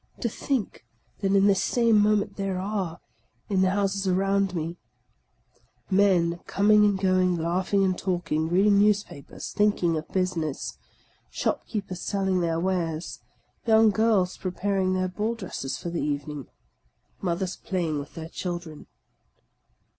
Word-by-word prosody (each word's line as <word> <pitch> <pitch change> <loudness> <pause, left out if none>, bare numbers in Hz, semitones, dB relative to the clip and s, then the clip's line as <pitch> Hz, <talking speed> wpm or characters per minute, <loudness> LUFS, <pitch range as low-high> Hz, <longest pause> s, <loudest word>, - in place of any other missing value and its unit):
To 235 - 0
think 250 0 -3 0.4
that 195 -1 +1
in 195 0 +5
this 200 -2 +4
same 230 -3 +3
moment 205 -1 +2
there 195 -2 -2
are, 190 -3 -3 0.5
in 195 -2 +2
the 190 - +4
houses 195 0 0
around 195 0 +1
me, 165 +1 -3 1.1
men 180 -3 +3
coming 210 +1 +4
and 205 -2 +2
going, 185 -2 +2
laughing 185 +4 +1
and 185 -1 +2
talking, 170 -4 -1
reading 200 +3 +4
newspapers, 205 -9 -1
thinking 205 -5 +2
of 155 - -5
business; 175 -6 -2 0.5
shopkeepers 195 -5 -3
selling 190 -2 0
their 165 -1 0
wares, 170 -3 -2 0.5
young 220 -1 +6
girls 205 -4 +2
preparing 185 0 -1
their 185 0 0
ball 210 +5 -2
dresses 180 - -5
for 170 - -5
the 170 - -2
evening; 145 -1 -3 0.7
mothe" 185 0 -1 0.2
playing 170 -5 -1
with 145 - -9
their 160 0 -7
children 175 -4 -6
185 Hz, 130 wpm, -26 LUFS, 170-200 Hz, 1.1 s, young